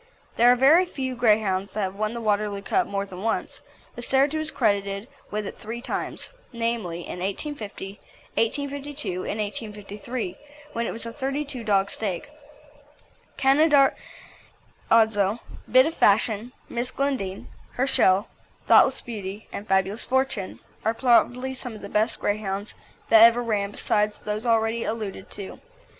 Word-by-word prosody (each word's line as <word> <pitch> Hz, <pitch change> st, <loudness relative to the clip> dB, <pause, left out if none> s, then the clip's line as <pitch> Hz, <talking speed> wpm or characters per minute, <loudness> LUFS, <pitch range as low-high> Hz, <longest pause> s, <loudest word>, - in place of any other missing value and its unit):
There 240 Hz, +1 st, +6 dB
are -, -, +5 dB
very 310 Hz, +9 st, +5 dB
few 265 Hz, -6 st, -3 dB
Greyhounds 210 Hz, -5 st, +2 dB
that 215 Hz, -, -2 dB
have 190 Hz, -1 st, -1 dB
won 215 Hz, +2 st, -2 dB
the 235 Hz, -, -4 dB
Waterloo 205 Hz, -2 st, 0 dB
Cup 370 Hz, -, +1 dB
more 200 Hz, 0 st, -2 dB
than 185 Hz, -2 st, -9 dB
once, 225 Hz, +1 st, -2 dB, 0.3 s
but 240 Hz, -, -7 dB
Cerito 275 Hz, +5 st, +2 dB
was 310 Hz, 0 st, -2 dB
credited 200 Hz, -3 st, 0 dB, 0.2 s
with 210 Hz, 0 st, -3 dB
it -, -, -7 dB
three 225 Hz, +2 st, -5 dB
times, 240 Hz, -, -4 dB, 0.2 s
namely, 230 Hz, -8 st, -2 dB
in 180 Hz, -, -7 dB
1850, 200 Hz, -, -5 dB, 0.3 s
1852, 285 Hz, +4 st, -2 dB, 0.2 s
and 210 Hz, -, -3 dB
1853, 210 Hz, 0 st, -5 dB, 0.4 s
when 235 Hz, 0 st, -1 dB
it -, -, -2 dB
was 230 Hz, -, -5 dB
a 230 Hz, -, -6 dB
thirty 275 Hz, +1 st, -2 dB
two 260 Hz, -4 st, -6 dB
dog 200 Hz, -2 st, +2 dB
stake. 205 Hz, +6 st, -4 dB, 1.1 s
Canaradzo, 275 Hz, 0 st, +4 dB, 1.7 s
Bit 255 Hz, +1 st, +7 dB
of 320 Hz, -, -1 dB
Fashion, 220 Hz, -1 st, +2 dB, 0.2 s
Miss 240 Hz, +1 st, -2 dB
Glendine, 255 Hz, -9 st, -2 dB, 0.3 s
Herschel, 235 Hz, -6 st, +3 dB, 0.4 s
Thoughtless -, -, +6 dB
Beauty, 205 Hz, -2 st, -7 dB
and 205 Hz, -, -6 dB
Fabulous 190 Hz, +3 st, +1 dB
Fortune, 260 Hz, -6 st, -1 dB, 0.2 s
are 225 Hz, +1 st, +1 dB
probably 250 Hz, +1 st, +3 dB
some 250 Hz, -3 st, -6 dB
of 210 Hz, -, -10 dB
the 200 Hz, -, -7 dB
best 215 Hz, +2 st, +1 dB
Greyhounds 205 Hz, 0 st, -2 dB, 0.4 s
that 225 Hz, -1 st, +8 dB
ever 235 Hz, +1 st, +7 dB
ran 205 Hz, -3 st, 0 dB
besides 210 Hz, 0 st, 0 dB
those 215 Hz, +3 st, -3 dB
already 225 Hz, 0 st, +2 dB
alluded 215 Hz, -4 st, -4 dB
to. 200 Hz, -2 st, -8 dB
225 Hz, 145 wpm, -25 LUFS, 200-255 Hz, 1.7 s, that